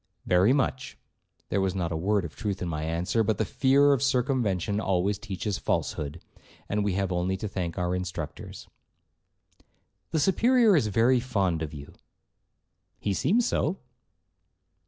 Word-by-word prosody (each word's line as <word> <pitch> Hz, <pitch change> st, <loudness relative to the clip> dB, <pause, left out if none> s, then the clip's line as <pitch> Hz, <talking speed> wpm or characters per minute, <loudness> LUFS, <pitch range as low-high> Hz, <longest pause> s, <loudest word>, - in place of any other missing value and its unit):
'Very 90 Hz, +6 st, +4 dB
much,' 135 Hz, -2 st, -1 dB, 0.5 s
(there 100 Hz, -, +1 dB
was 95 Hz, -1 st, 0 dB
not 85 Hz, -3 st, -2 dB
a -, -, -2 dB
word 95 Hz, +3 st, 0 dB
of 80 Hz, -, -9 dB
truth 100 Hz, -3 st, -3 dB
in 90 Hz, -, -3 dB
my 75 Hz, -2 st, -3 dB
answer, 85 Hz, +8 st, 0 dB
but 110 Hz, -1 st, 0 dB
the -, -, 0 dB
fear 140 Hz, +2 st, +4 dB
of 135 Hz, -, 0 dB
circumvention 120 Hz, -, 0 dB
always 95 Hz, 0 st, 0 dB
teaches 100 Hz, -1 st, -4 dB
falsehood, 75 Hz, +3 st, -2 dB, 0.5 s
and 105 Hz, 0 st, 0 dB
we 100 Hz, -2 st, 0 dB
have 95 Hz, 0 st, -1 dB
only 90 Hz, +2 st, 0 dB
to 105 Hz, -, -4 dB
thank 90 Hz, -4 st, -4 dB
our 90 Hz, 0 st, -1 dB
instructors). 90 Hz, -4 st, -6 dB, 1.4 s
'The 160 Hz, -, 0 dB
Superior 225 Hz, -, +4 dB
is 140 Hz, -9 st, +2 dB
very 115 Hz, +5 st, +3 dB
fond 100 Hz, -9 st, -1 dB
of 80 Hz, -2 st, -4 dB
you.' 70 Hz, -1 st, -10 dB, 1.0 s
'He 100 Hz, -, -2 dB
seems 230 Hz, -, +2 dB
so.' 175 Hz, -, 0 dB
100 Hz, 155 wpm, -27 LUFS, 90-125 Hz, 1.4 s, Very